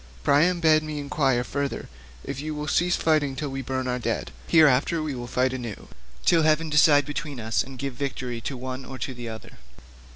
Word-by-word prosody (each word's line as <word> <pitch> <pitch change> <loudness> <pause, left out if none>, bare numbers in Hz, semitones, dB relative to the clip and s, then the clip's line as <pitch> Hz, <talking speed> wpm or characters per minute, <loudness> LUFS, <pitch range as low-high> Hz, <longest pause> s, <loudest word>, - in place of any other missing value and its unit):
Priam 170 - +3
bade 155 -1 +5
me 155 -1 -5
inquire 140 -3 +1
further 140 +2 -3 0.4
if 140 0 -5
you 155 0 -4
will 150 0 -4
cease 175 +4 +2
fighting 150 -4 +1
till 145 +1 -3
we 135 0 -4
burn 130 0 -3
our 125 0 -1
dead; 115 -1 -2 0.2
hereafter 155 0 +4
we 150 -2 -3
will 120 -1 -6
fight 130 +1 +1
anew, 120 -5 -6 0.4
till 170 -2 +5
heaven 155 0 +2
decide 150 -1 +5
between 145 -2 -5
us 110 0 0
and 135 -1 -10
give 135 0 -4
victory 125 -3 -4
to 135 +3 -4
one 130 +1 -5
or 130 0 -8
to 130 - -4
the 120 -1 -7
other." 110 -10 -10
140 Hz, 200 wpm, -25 LUFS, 125-155 Hz, 0.4 s, bade